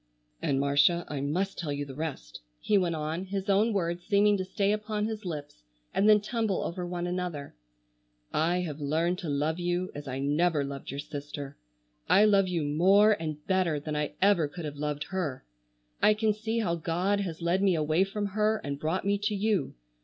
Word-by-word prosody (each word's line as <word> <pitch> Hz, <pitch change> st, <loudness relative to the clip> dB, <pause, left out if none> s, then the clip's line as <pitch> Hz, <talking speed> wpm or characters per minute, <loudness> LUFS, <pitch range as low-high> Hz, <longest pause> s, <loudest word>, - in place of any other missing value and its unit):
"And 135 Hz, -1 st, +1 dB
Marcia, 145 Hz, +5 st, +3 dB
I 145 Hz, -2 st, -3 dB
must 180 Hz, +8 st, -1 dB
tell 155 Hz, -4 st, -3 dB
you 145 Hz, 0 st, -3 dB
the 135 Hz, -, -9 dB
rest," 135 Hz, -, -6 dB, 0.2 s
he 210 Hz, -, +1 dB
went 180 Hz, -4 st, +2 dB
on, 160 Hz, +4 st, -3 dB
his 195 Hz, +1 st, -4 dB
own 210 Hz, +4 st, +3 dB
words 175 Hz, -3 st, -1 dB
seeming 205 Hz, +1 st, +4 dB
to 190 Hz, -, -2 dB
stay 195 Hz, +2 st, 0 dB
upon 210 Hz, 0 st, -1 dB
his 220 Hz, -2 st, -4 dB
lips, 145 Hz, -, -6 dB, 0.3 s
and 205 Hz, +2 st, +3 dB
then 210 Hz, 0 st, +7 dB
tumble 215 Hz, -2 st, -1 dB
over 175 Hz, +1 st, -4 dB
one 175 Hz, 0 st, -3 dB
another; 175 Hz, -5 st, -4 dB, 0.8 s
"I 170 Hz, +3 st, +2 dB
have 155 Hz, -4 st, -5 dB
learned 165 Hz, +5 st, 0 dB
to 170 Hz, -, -5 dB
love 150 Hz, +4 st, 0 dB
you 175 Hz, +1 st, -1 dB
as 145 Hz, 0 st, -8 dB
I 130 Hz, 0 st, -3 dB
never 145 Hz, +3 st, +1 dB
loved 140 Hz, -1 st, -6 dB
your 140 Hz, -, -5 dB
sister. 145 Hz, -1 st, -6 dB, 0.5 s
I 205 Hz, +3 st, +6 dB
love 200 Hz, -2 st, +4 dB
you 175 Hz, -3 st, -1 dB
more 190 Hz, +9 st, +5 dB
and 155 Hz, -2 st, -5 dB
better 185 Hz, -5 st, +1 dB
than 150 Hz, +1 st, -4 dB
I 150 Hz, -1 st, -2 dB
ever 195 Hz, -6 st, +4 dB
could 165 Hz, +3 st, -7 dB
have 145 Hz, -1 st, -6 dB
loved 150 Hz, 0 st, -2 dB
her. 160 Hz, -9 st, -3 dB, 0.6 s
I 215 Hz, -, +5 dB
can 215 Hz, 0 st, +2 dB
see 220 Hz, +2 st, -3 dB
how 200 Hz, -7 st, +1 dB
God 180 Hz, +5 st, 0 dB
has 175 Hz, -5 st, -4 dB
led 175 Hz, +3 st, +2 dB
me 195 Hz, -3 st, +3 dB
away 155 Hz, +3 st, +2 dB
from 205 Hz, +1 st, -3 dB
her 215 Hz, +2 st, +1 dB
and 140 Hz, 0 st, -4 dB
brought 165 Hz, +5 st, -1 dB
me 200 Hz, 0 st, +1 dB
to 210 Hz, +1 st, -1 dB
you. 200 Hz, -8 st, 0 dB
175 Hz, 200 wpm, -29 LUFS, 150-200 Hz, 0.8 s, then